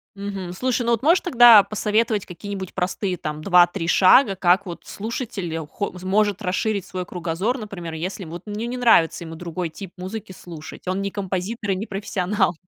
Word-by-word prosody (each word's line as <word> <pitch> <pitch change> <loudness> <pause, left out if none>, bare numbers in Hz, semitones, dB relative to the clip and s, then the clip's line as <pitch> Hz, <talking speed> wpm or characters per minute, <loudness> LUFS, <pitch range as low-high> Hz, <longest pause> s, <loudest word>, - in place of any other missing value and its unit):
Мгм. 195 -3 -5
Слушай, 250 +5 -1
ну, 235 - +1
вот 235 +1 +1
можешь 335 +5 +5
тогда 240 - +8
посоветовать 215 0 0
какие-нибудь 190 +1 -7
простые 185 0 -2
там 155 -1 -5
2-3 175 -1 +4
шага, 195 +5 +5
как 185 +1 +3
вот 175 -2 -7
слушатель 210 -6 -5
хо 205 +6 -4
может 205 +1 +1
расширить 200 +1 -1
свой 185 -1 -5
кругозор, 180 +8 -2
например, 190 -6 -7
если 185 +4 -5
вот 170 +2 -8
не 210 +2 -4
не 250 +1 -4
нравится 225 -10 +4
ему 165 0 -8
другой 170 +1 -4
тип 185 +3 -9
музыки 190 +2 -6
слушать. 170 -2 -11
Он 185 +2 -1
не 200 0 -3
композитор 200 +2 -3
и - - +1
не 195 +4 -4
профессионал. 195 -2 -1
195 Hz, 175 wpm, -22 LUFS, 180-215 Hz, -, тогда